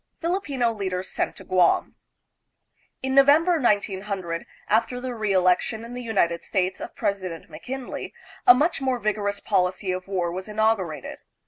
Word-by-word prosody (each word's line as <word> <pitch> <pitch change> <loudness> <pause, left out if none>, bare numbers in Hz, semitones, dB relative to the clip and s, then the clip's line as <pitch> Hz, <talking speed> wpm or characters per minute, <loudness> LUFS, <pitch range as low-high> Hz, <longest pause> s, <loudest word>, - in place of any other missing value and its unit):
Filipino 290 -9 0
Leaders 190 -3 -3
Sent - - -1
to - - -11
Guam. 180 -2 +2 1.1
In 265 0 -1
November, 305 +5 +5
1900,: 195 -5 -1 0.2
after 230 +3 +1
the 255 0 -4
reelection 205 +1 +1
in 235 - -9
the 250 - -5
United 190 -8 +1
States 185 -1 -1
of - - -7
President 185 -5 -3
McKinley, 250 - -6 0.4
a 245 - +10
much 300 +3 +1
more 260 -1 +1
vigorous 205 -2 -1
policy 185 -1 0
of 185 0 -4
war 180 -3 -1
was 185 +3 -5
inaugurated. 210 -7 -1
205 Hz, 140 wpm, -25 LUFS, 185-245 Hz, 1.1 s, a